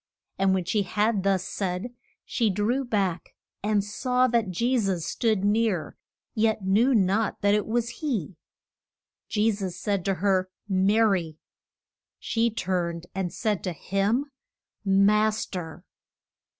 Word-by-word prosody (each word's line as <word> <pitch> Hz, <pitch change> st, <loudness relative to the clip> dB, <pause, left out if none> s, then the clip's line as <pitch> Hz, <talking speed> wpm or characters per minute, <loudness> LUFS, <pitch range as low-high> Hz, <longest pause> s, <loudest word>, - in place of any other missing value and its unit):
And 190 Hz, 0 st, +3 dB
when 185 Hz, -2 st, -1 dB
she 205 Hz, +3 st, +1 dB
had 210 Hz, +2 st, +1 dB
thus 190 Hz, -1 st, +1 dB
said, 190 Hz, +4 st, -3 dB, 0.3 s
she 230 Hz, -3 st, +1 dB
drew 215 Hz, +7 st, 0 dB
back 195 Hz, -8 st, -2 dB, 0.3 s
and 210 Hz, -1 st, +1 dB
saw 250 Hz, +5 st, +1 dB
that 230 Hz, -4 st, +1 dB
Je 235 Hz, +9 st, 0 dB
sus 190 Hz, -6 st, -1 dB
stood 215 Hz, +1 st, 0 dB
near, 210 Hz, -5 st, +1 dB, 0.4 s
yet 220 Hz, -2 st, +1 dB
knew 230 Hz, +7 st, +3 dB
not 205 Hz, +2 st, +1 dB
that 205 Hz, 0 st, +3 dB
it 210 Hz, 0 st, +1 dB
was 235 Hz, +1 st, 0 dB
he. 220 Hz, -, -2 dB, 0.9 s
Je 220 Hz, +1 st, +2 dB
sus 195 Hz, -4 st, -4 dB
said 200 Hz, -3 st, -1 dB
to 195 Hz, -1 st, +1 dB
her, 185 Hz, 0 st, +1 dB, 0.2 s
Ma 195 Hz, +3 st, +3 dB
ry! 180 Hz, -8 st, +1 dB, 0.8 s
She 230 Hz, 0 st, 0 dB
turned 175 Hz, -5 st, -2 dB
and 185 Hz, -2 st, -2 dB
said 215 Hz, -4 st, -1 dB
to 180 Hz, -, -2 dB
him, 205 Hz, -, -1 dB, 0.5 s
Mas 210 Hz, +2 st, +3 dB
ter! 175 Hz, -2 st, -7 dB
205 Hz, 135 wpm, -26 LUFS, 185-225 Hz, 0.9 s, And